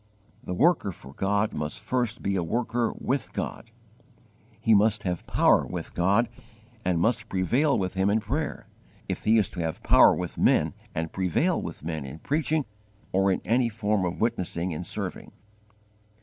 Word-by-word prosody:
The 90 Hz, -, -4 dB
worker 160 Hz, -, +3 dB
for 70 Hz, -5 st, -11 dB
God 100 Hz, +5 st, 0 dB
must 75 Hz, 0 st, -3 dB
first 120 Hz, -3 st, -2 dB
be 100 Hz, 0 st, 0 dB
a 95 Hz, -, +1 dB
worker 115 Hz, +6 st, 0 dB
with 130 Hz, -3 st, -2 dB
God: -, -, -5 dB, 0.9 s
he 115 Hz, -, +3 dB
must 105 Hz, +1 st, +3 dB
have 90 Hz, -2 st, -3 dB
power -, -, +4 dB
with -, -, -6 dB
God 100 Hz, +7 st, +3 dB, 0.6 s
and 90 Hz, -2 st, +1 dB
must 110 Hz, +4 st, +1 dB
prevail 125 Hz, -, +2 dB
with 95 Hz, -1 st, -2 dB
Him 95 Hz, +1 st, +1 dB
in 105 Hz, +2 st, +3 dB
prayer, 140 Hz, +8 st, -3 dB, 0.4 s
if -, -, -4 dB
he 110 Hz, +1 st, +5 dB
is 105 Hz, -4 st, +3 dB
to -, -, -7 dB
have 80 Hz, -1 st, -3 dB
power -, -, +6 dB
with -, -, -5 dB
men -, -, +3 dB, 0.2 s
and 80 Hz, 0 st, -3 dB
prevail 95 Hz, -3 st, +1 dB
with -, -, -7 dB
men 80 Hz, -2 st, -3 dB
in 70 Hz, +3 st, -8 dB
preaching 150 Hz, -, 0 dB, 0.5 s
or 95 Hz, +1 st, +3 dB
in 95 Hz, -, -1 dB
any 120 Hz, +1 st, +2 dB
form 105 Hz, -2 st, 0 dB
of 90 Hz, -1 st, -2 dB
witnessing 90 Hz, -6 st, -1 dB
and 85 Hz, +3 st, -5 dB
serving. -, -, -5 dB
100 Hz, 170 wpm, -26 LUFS, 90-115 Hz, 0.9 s, power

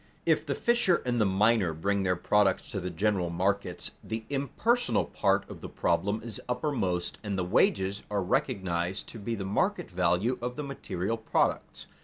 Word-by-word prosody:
If -, -, +2 dB
the -, -, 0 dB
fisher 235 Hz, -7 st, +2 dB
and 120 Hz, -2 st, +1 dB
the 105 Hz, -, +4 dB
miner 100 Hz, -2 st, +3 dB
bring 100 Hz, +5 st, 0 dB
their 90 Hz, -1 st, +1 dB
products 105 Hz, +8 st, +2 dB
to 100 Hz, -, -2 dB
the 90 Hz, 0 st, -3 dB
general 90 Hz, 0 st, 0 dB
markets, 90 Hz, +1 st, -1 dB
the 110 Hz, 0 st, -4 dB
impersonal 225 Hz, -, +1 dB
part 100 Hz, 0 st, +1 dB
of -, -, -10 dB
the -, -, -7 dB
problem 100 Hz, +2 st, 0 dB
is 115 Hz, -3 st, -5 dB
uppermost 125 Hz, -, -1 dB
and 100 Hz, -2 st, -2 dB
the 90 Hz, -, 0 dB
wages 95 Hz, +2 st, +2 dB
are 100 Hz, -2 st, 0 dB
recognized 90 Hz, 0 st, -1 dB
to 115 Hz, -, -9 dB
be 115 Hz, +3 st, -3 dB
the 100 Hz, -3 st, -4 dB
market 95 Hz, -, 0 dB
value 110 Hz, +9 st, +1 dB
of 125 Hz, +1 st, -3 dB
the 150 Hz, -, -4 dB
material 115 Hz, -6 st, -3 dB
products. 110 Hz, -, -1 dB
100 Hz, 175 wpm, -29 LUFS, 95-115 Hz, -, the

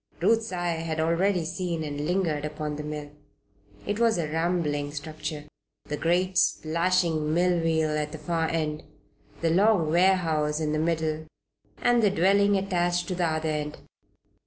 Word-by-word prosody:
Ruth's 225 Hz, -1 st, +2 dB
eyes 175 Hz, -2 st, -2 dB
had 160 Hz, -1 st, -2 dB
already 170 Hz, +2 st, +1 dB
seen 165 Hz, 0 st, -3 dB
and 145 Hz, 0 st, -4 dB
lingered 170 Hz, -5 st, 0 dB
upon 150 Hz, 0 st, -4 dB
the 150 Hz, -, -5 dB
mill. 150 Hz, -1 st, -6 dB, 0.7 s
It 205 Hz, +1 st, -2 dB
was 230 Hz, -4 st, +3 dB
a 165 Hz, -3 st, -1 dB
rambling 155 Hz, -3 st, -1 dB
structure, 155 Hz, 0 st, -5 dB, 0.4 s
the 150 Hz, -, -3 dB
great, 180 Hz, +4 st, +1 dB
splashing 165 Hz, -1 st, +1 dB
millwheel 165 Hz, -3 st, +2 dB
at 150 Hz, 0 st, -2 dB
the 160 Hz, -, -6 dB
far 165 Hz, 0 st, -1 dB
end, 155 Hz, -2 st, -2 dB, 0.6 s
the 165 Hz, -1 st, +2 dB
long 190 Hz, -3 st, +3 dB
warehouse 165 Hz, -4 st, +2 dB
in 155 Hz, -1 st, -1 dB
the 155 Hz, -, 0 dB
middle, 160 Hz, -1 st, -1 dB, 0.6 s
and 240 Hz, -1 st, +4 dB
the 210 Hz, -, +4 dB
dwelling 200 Hz, +3 st, +3 dB
attached 175 Hz, -2 st, 0 dB
to -, -, -1 dB
the 175 Hz, -1 st, 0 dB
other 160 Hz, 0 st, -1 dB
end. 150 Hz, -1 st, -3 dB
165 Hz, 155 wpm, -26 LUFS, 155-180 Hz, 0.7 s, and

